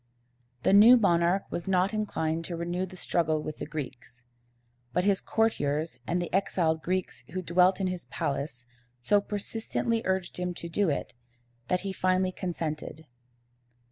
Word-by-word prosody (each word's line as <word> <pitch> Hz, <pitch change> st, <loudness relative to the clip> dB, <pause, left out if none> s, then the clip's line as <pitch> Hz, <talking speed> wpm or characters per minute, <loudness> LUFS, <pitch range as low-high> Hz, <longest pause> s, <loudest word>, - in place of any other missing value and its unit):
The -, -, +4 dB
new 225 Hz, +5 st, +9 dB
monarch 175 Hz, -2 st, +3 dB
was 170 Hz, -, -4 dB
not 190 Hz, +2 st, +2 dB
inclined 165 Hz, -7 st, -1 dB
to 175 Hz, -, -4 dB
renew 175 Hz, +2 st, -2 dB
the 185 Hz, 0 st, -12 dB
struggle 160 Hz, -3 st, +1 dB
with 155 Hz, -, -5 dB
the -, -, -5 dB
Greeks; 130 Hz, -5 st, -7 dB, 0.7 s
but 180 Hz, -, +2 dB
his 200 Hz, -1 st, +2 dB
courtiers 155 Hz, -, 0 dB
and 175 Hz, -, +1 dB
the 175 Hz, -1 st, -4 dB
exiled 170 Hz, -4 st, +1 dB
Greeks 180 Hz, -8 st, -2 dB
who 185 Hz, 0 st, -3 dB
dwelt 180 Hz, +3 st, +4 dB
in 195 Hz, -, 0 dB
his 185 Hz, -1 st, -3 dB
palace 140 Hz, -3 st, -3 dB, 0.3 s
so 200 Hz, +12 st, +3 dB
persistently 225 Hz, +3 st, -2 dB
urged 190 Hz, -2 st, -1 dB
him 180 Hz, 0 st, -2 dB
to 170 Hz, -, -6 dB
do 185 Hz, +2 st, +1 dB
it, 140 Hz, -, -2 dB, 0.5 s
that 180 Hz, -, +1 dB
he 195 Hz, -1 st, -4 dB
finally 185 Hz, 0 st, +1 dB
consented. 160 Hz, -4 st, -4 dB
180 Hz, 155 wpm, -28 LUFS, 160-190 Hz, 0.7 s, new